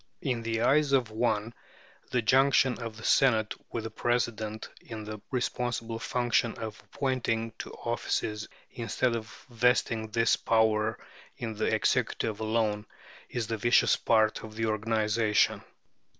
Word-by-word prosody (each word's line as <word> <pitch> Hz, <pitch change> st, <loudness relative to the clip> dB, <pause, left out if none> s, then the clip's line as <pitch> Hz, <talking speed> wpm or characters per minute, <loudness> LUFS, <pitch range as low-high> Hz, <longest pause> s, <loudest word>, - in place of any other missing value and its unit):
In 125 Hz, -5 st, -1 dB
the 115 Hz, 0 st, -2 dB
eyes 140 Hz, +3 st, +3 dB
of 125 Hz, -5 st, +2 dB
one 110 Hz, 0 st, 0 dB, 0.6 s
the 125 Hz, -2 st, 0 dB
junction 130 Hz, +1 st, +4 dB
of 115 Hz, -2 st, -6 dB
the 110 Hz, -, -11 dB
Senate 110 Hz, -5 st, +3 dB, 0.2 s
with 115 Hz, -, -3 dB
the 110 Hz, -, -5 dB
President 110 Hz, -3 st, -1 dB, 0.2 s
in 110 Hz, -2 st, -7 dB
the 105 Hz, 0 st, -7 dB
responsible 120 Hz, -2 st, -2 dB
function 120 Hz, -1 st, 0 dB
of 110 Hz, -1 st, -7 dB
appointing 120 Hz, -4 st, -1 dB
to -, -, -6 dB
offices, 110 Hz, -2 st, -2 dB, 0.2 s
instead 115 Hz, +1 st, -1 dB
of 110 Hz, -1 st, -4 dB, 0.2 s
vesting 115 Hz, -2 st, +1 dB
this 115 Hz, +1 st, +3 dB
power 110 Hz, -1 st, +2 dB, 0.4 s
in 115 Hz, -2 st, -4 dB
the 110 Hz, -, -2 dB
executive 110 Hz, -2 st, 0 dB
alone, 110 Hz, -1 st, 0 dB, 0.4 s
is 120 Hz, -2 st, -2 dB
the 115 Hz, 0 st, -3 dB
vicious 120 Hz, +3 st, +4 dB
part 110 Hz, -1 st, +2 dB
of 110 Hz, -1 st, -9 dB
the 115 Hz, 0 st, -1 dB
organization. 110 Hz, 0 st, +1 dB
115 Hz, 135 wpm, -29 LUFS, 110-120 Hz, 0.6 s, junction